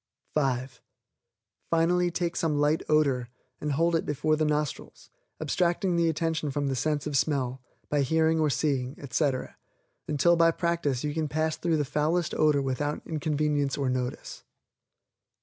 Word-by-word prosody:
(5) 130 -3 -1 0.9
Finally 175 +2 +2
take 175 0 -2
some 155 -3 0
light 150 +2 +2
odor, 140 -6 +2 0.3
and 150 -1 -2
hold 165 +3 +2
it 165 - +1
before 155 +2 0
the 155 - 0
nostrils, 150 -1 -3 0.3
abstracting 175 +3 0
the 170 -1 +3
attention 160 -1 -1
from 145 +1 -2
the 135 - -1
sense 145 +3 -1
of 150 -2 -3
smell, 130 -2 0 0.3
by 145 -1 +1
hearing 160 +3 +2
or 155 -1 +2
seeing, 135 -3 -1
etc., 135 -1 -1 0.5
until 155 +4 +3
by 165 0 +5
practice 165 -6 -1
you 150 -1 -2
can 155 0 -1
pass 155 +1 0
through 165 -2 0
the 145 - 0
foulest 155 +4 0
odor 150 -2 +3
without 145 +3 -2
inconvenience 150 -2 0
or 135 -3 0
notice. 125 -1 -4
150 Hz, 150 wpm, -27 LUFS, 140-160 Hz, 0.9 s, by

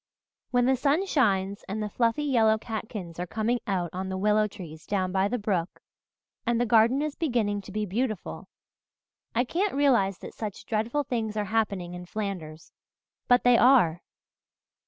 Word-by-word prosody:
"When 245 -1 +2
the 265 +1 +4
sun 285 +8 +1
shines 200 - +1
and 215 +2 -3
the - - -2
fluffy 235 +6 +1
yellow 225 -6 +3
catkins 215 -6 -6
are 180 - -3
coming 225 +5 0
out 180 -4 -1
on 190 +1 -4
the 190 - -3
willow 210 +2 +3
trees 160 -6 -11
down 185 -2 0
by 190 +1 +2
the 245 +4 -1
brook, 195 -5 -2 0.6
and 235 -1 +1
the 245 - +2
garden 235 +5 +4
is 305 -1 -2
beginning 230 -9 0
to 195 - -11
be 210 +1 -2
beautiful 215 +1 -3 0.9
I 240 - +3
can't 370 +9 -1
realize 235 -10 +3
that - - -10
such 210 -3 -6
dreadful 230 +6 -1
things 225 -5 -3
are 210 - 0
happening 200 -6 0
in 180 0 -8
Flanders. 180 -7 -5 0.6
But 245 -1 +4
they 245 -1 +5
are! 230 -11 +5
215 Hz, 170 wpm, -27 LUFS, 190-245 Hz, 0.9 s, they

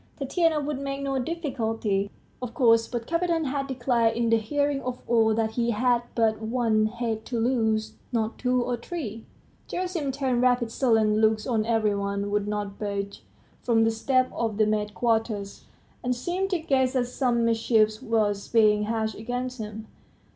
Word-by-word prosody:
Tatiana 315 +3 +1
would 290 -1 -3
make 275 0 -4
no 270 -1 -1
difficulty, 225 - -1 0.3
of 250 -2 -6
course; 230 -2 +4
but 240 -2 -4
Kapiton 335 0 0
had 275 0 -2
declared 240 -3 +1
in 235 -1 +1
the 230 - +6
hearing 285 +5 0
of 250 -1 -4
all 225 -2 +3
that 220 -1 0
he 235 +1 0
had 240 +2 +2
but 220 -2 +2
one 220 -1 +1
head 225 -1 -3
to 240 -2 -2
lose, 220 -3 +1 0.2
not 225 -2 -1
two 250 -1 +1
or 245 0 -1
three... 230 - -6 0.4
Gerasim 355 -6 -2
turned 260 -3 0
rapid 245 -2 +2
sullen 220 -4 +2
looks 220 -1 +2
on 225 -3 0
every 220 -3 +2
one, 200 0 -2
would 205 0 0
not 205 -1 -3
budge 200 -1 -4 0.4
from 230 -2 +3
the 225 - +3
steps 255 +3 +1
of 225 -3 -1
the 215 - +4
maids' 210 0 0
quarters, 220 -2 -1 0.4
and 250 0 0
seemed 355 +9 -2
to 370 - +1
guess 270 -5 +1
that 255 -2 +1
some 240 -2 0
mischief 225 -1 +2
was 215 -5 0
being 210 -2 +4
hatched 220 0 -1
against 245 +3 -4
him. 215 0 -6
230 Hz, 170 wpm, -26 LUFS, 220-255 Hz, 0.4 s, the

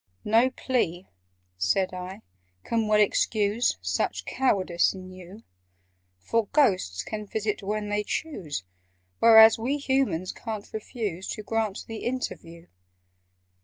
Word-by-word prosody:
"No 230 +4 +4
plea," 195 -9 -2 0.5
said 185 - +1
I, 185 +1 -7 0.4
"can 225 -2 0
well 210 0 +4
excuse 210 +2 +2
Such - - -1
cowardice 185 -9 +1
in 185 0 -10
you: 185 +4 -12 0.7
For 225 - -1
Ghosts 185 - +2
can 210 -1 -6
visit 210 0 -2
when 210 +1 -3
they 210 0 0
choose, 195 - -4 0.6
Whereas 220 -1 +8
we 260 +6 -1
Humans 265 - 0
ca'n't 215 -3 -7
refuse 210 -4 -4
To 215 - -5
grant 220 -2 -2
the 225 - -7
interview." 175 -9 -5
210 Hz, 120 wpm, -26 LUFS, 185-230 Hz, 0.7 s, Whereas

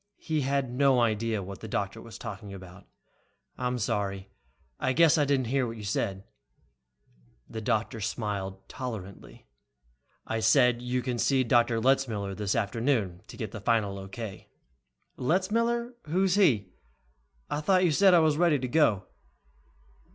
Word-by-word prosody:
He 155 -2 -2
had 135 -1 0
no 135 -1 +4
idea 110 -2 0
what 95 +1 -8
the 110 - -8
doctor 100 +1 -3
was 115 -1 -10
talking 100 -3 -7
about. 95 0 -12 0.7
"I'm 125 0 -2
sorry, 100 -4 -2 0.5
I 130 - +1
guess 165 +2 +5
I 145 - +3
didn't 135 -2 +1
hear 130 +1 0
what 115 0 -6
you 105 - -8
said 100 -1 -2 0.6
" - - -36
The 110 - -5
doctor 110 +1 -1
smiled 100 -3 -4
tolerantly. 110 -7 -8 0.8
"I 115 - -2
said 120 +2 +4
you 125 0 -2
can 125 -2 -2
see 135 +1 +3
Dr. 120 -1 +3
Letzmiller 115 -6 +1
this 100 0 -2
afternoon 115 -4 0
to - - -11
get 110 -4 -5
the 110 - -7
final 105 -3 +1
O.K." 95 +1 -8 0.7
"Letzmiller? 230 - 0
Who's 185 +4 +2
he? 120 - +3 0.8
I 145 - -2
thought 185 +3 +3
you 175 - +3
said 190 +4 +5
I - - +7
was 155 -2 +2
ready 170 -3 +4
to 130 -1 -3
go." 120 - +2
115 Hz, 150 wpm, -28 LUFS, 100-135 Hz, 0.8 s, I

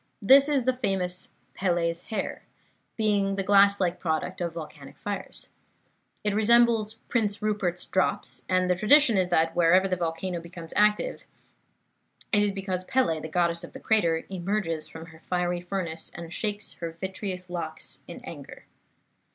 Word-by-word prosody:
This 270 +7 +6
is 280 -4 +2
the 255 +1 +1
famous 185 -6 0 0.2
Pele's 170 -2 -1
Hair, 220 - -4 0.6
being 205 -3 +1
the 195 - -1
glass 200 0 +5
like 180 -2 0
product 170 +2 -2
of 170 -1 -3
volcanic 150 -4 -9
fires. 205 -1 -6 0.7
It 210 -1 0
resembles 225 0 +4
Prince 210 -4 0
Rupert's 205 -5 -1
Drops, 190 - 0
and 185 0 +2
the 180 - +3
tradition 235 +6 +5
is 185 -2 +2
that 165 -1 +2
whenever 175 +3 +4
the 185 - 0
volcano 170 +1 -3
becomes 170 -1 -9
active 210 - +2 1.1
it 205 - +5
is 205 -1 +2
because 190 -2 -3
Pele, 250 -12 +1
the 160 - -6
Goddess 170 +1 0
of 175 - -10
the - - -8
crater, 170 -7 +1
emerges 180 -3 -2
from 160 0 -10
her 160 -1 -15
fiery 180 -1 0
furnace 175 -3 -4
and 170 0 -7
shakes 210 -1 -2
her 165 -2 -6
vitreous 190 -1 -5
locks 170 -3 -5
in - - -9
anger. - - -10
185 Hz, 155 wpm, -27 LUFS, 170-210 Hz, 1.1 s, This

